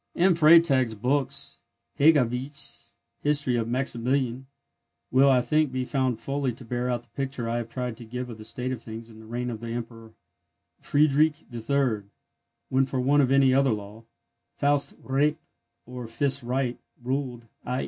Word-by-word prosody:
M. 180 +2 +4
Freytag's 155 -7 +5
books, 130 +5 -1 0.4
and 155 +3 +7
Hegewisch's 130 +2 -2 0.3
History 145 -4 +2
of 115 -1 0
Maximilian, 130 +1 -1 0.6
will, 135 +2 +5
I 130 -2 +5
think, 150 +3 +1
be 130 0 -2
found 130 -4 0
fully 140 0 -1
to 125 - -12
bear 125 +2 -2
out 120 -1 -1
the 120 - -27
picture 135 -1 -4
I 115 +1 -1
have 115 -1 -4
tried 125 -2 -4
to - - -9
give 125 +2 -5
of 115 -3 -9
the - - -8
state 125 +3 -3
of 125 -3 -4
things 115 0 -9
in 110 - -14
the 110 - -13
reign 120 +2 -3
of 110 - -6
the 115 - -7
Emperor 115 -1 -7 0.7
Friedrich 150 +1 +2
III., 120 -1 0 0.7
when, 135 +1 +3
for 130 0 -3
want 140 +3 +4
of 130 -1 +2
any 135 -1 +5
other 135 0 +4
law, 105 0 -5 0.5
Faust 145 0 +1
recht, 145 +3 +1 0.5
or 125 -1 -7
fist 140 +4 0
right, 125 0 -2 0.2
ruled; 125 -2 -3 0.2
_i. 125 +1 -1
125 Hz, 170 wpm, -26 LUFS, 120-140 Hz, 0.7 s, and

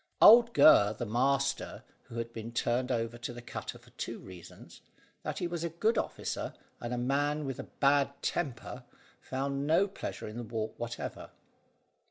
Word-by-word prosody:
Old 235 +2 +8
Gurr 105 -8 +7
the 120 - -3
master, 135 +5 0 0.2
who - - -11
had 115 0 -4
been 115 +1 -6
turned 120 +2 0
over 115 0 -1
to 120 - -4
the 120 - -8
cutter - - -6
for - - -20
two - - -5
reasons, 90 -3 -12 0.4
that - - -4
he - - -1
was 170 -1 -3
a 170 - -1
good 215 +8 +1
officer - - -3 0.2
and 120 - -5
a 125 - -1
man 145 +4 0
with 135 -2 -4
a - - -5
bad 140 0 +3
temper, 125 -5 -3 0.4
found 140 +1 -2
no 165 +6 +4
pleasure 200 - -6
in 105 +2 -7
the 120 - -4
walk 110 -1 -3
whatever. 120 0 -5
130 Hz, 175 wpm, -31 LUFS, 115-145 Hz, 0.4 s, Old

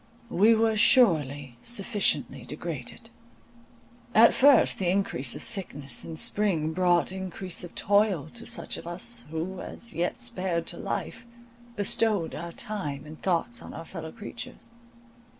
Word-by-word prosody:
We 220 +4 +5
were 220 0 +2
surely 145 - +3
sufficiently 200 - +1
degraded. 150 - -7 1.0
At 230 +1 +8
first 275 -2 +5
the 185 -3 +1
increase 175 -9 0
of - - -6
sickness 145 - -2
in 165 - -7
spring 160 -3 +2
brought 175 0 +2
increase 190 -1 -4
of 175 - -10
toil 200 -7 +2
to 235 -1 -9
such - - -1
of - - -9
us, 185 +7 -3
who, 170 +4 -4
as 235 0 -7
yet 175 +8 -1
spared 185 -9 -1
to - - -7
life, 250 - -4 0.5
bestowed 205 -3 +1
our 170 +2 -6
time 150 -10 -5
and 155 +1 -11
thoughts 165 -10 0
on - - -9
our 165 +2 -7
fellow 160 -2 -7
creatures. 235 +1 -9
185 Hz, 140 wpm, -27 LUFS, 160-215 Hz, 1.0 s, At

